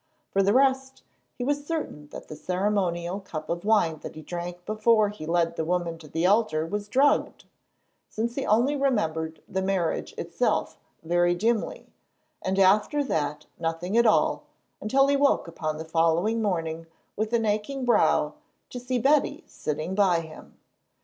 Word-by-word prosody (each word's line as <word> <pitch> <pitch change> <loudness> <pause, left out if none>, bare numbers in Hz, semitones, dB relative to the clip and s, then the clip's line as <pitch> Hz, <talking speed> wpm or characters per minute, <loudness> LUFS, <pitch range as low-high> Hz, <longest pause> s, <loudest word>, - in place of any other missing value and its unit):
For 195 - +2
the 195 +1 +3
rest, 265 +1 +2 0.3
he 245 - -4
was 290 +2 -1
certain 295 - -4
that - - -10
the 155 - -8
ceremonial 180 0 -1
cup 155 -5 -6
of 170 +1 -3
wine 200 -8 +2
that - - -9
he 155 - -9
drank 175 +1 -6
before 215 0 +3
he 180 -7 -8
led 170 0 +1
the - - 0
woman 170 0 -1
to 155 - -12
the 165 +3 -1
altar 195 -6 +2
was 205 +4 -4
drugged, 275 +6 +2 0.6
since 230 +2 -2
he 270 - -3
only 240 +7 +2
remembered 165 - -1
the 190 - -2
marriage 190 -3 -1
itself - - -1 0.3
very 175 +1 +2
dimly, 225 +4 -1 0.5
and 190 +1 -1
after 205 +10 +4
that 150 - -2
nothing 165 +4 -2
at 235 0 +5
all 215 - +2 0.4
until 270 +6 +3
he 280 0 +2
woke 280 -8 +2
upon 155 -2 -4
the 160 - -6
following 165 +7 +1
morning 165 -5 -2 0.3
with 215 +1 -2
an 235 -2 +1
aching 215 +6 -1
brow 240 - +3 0.4
to 250 - -5
see 250 +1 -2
Betty 290 +5 +2
sitting 155 +4 -4
by 190 -4 +3
him. 160 -1 -13
195 Hz, 165 wpm, -26 LUFS, 165-235 Hz, 0.6 s, at